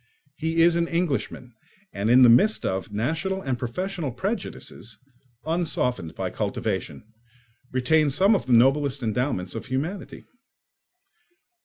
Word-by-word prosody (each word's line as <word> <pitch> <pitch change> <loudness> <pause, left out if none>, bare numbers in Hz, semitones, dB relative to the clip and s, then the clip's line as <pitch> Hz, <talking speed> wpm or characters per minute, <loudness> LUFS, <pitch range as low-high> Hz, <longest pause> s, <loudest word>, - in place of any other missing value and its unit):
He 160 +2 +1
is 170 0 +4
an 170 0 +1
Englishman, 155 -7 -2 0.4
and 100 +2 -1
in 125 +2 +7
the - - +9
midst 205 - +4
of 95 +2 -2
national 160 - -2
and 130 -3 -2
professional 160 +5 -3
prejudices, 170 - -5 0.5
unsoftened 135 - -1
by - - -3
cultivation, 70 - -3 0.7
retains 140 +3 +2
some 195 +7 +5
of 195 - -1
the 125 - +2
noblest 135 +3 +3
endowments 110 -5 -1
of 115 - -6
humanity. 155 +10 -4
135 Hz, 125 wpm, -25 LUFS, 120-170 Hz, 0.7 s, the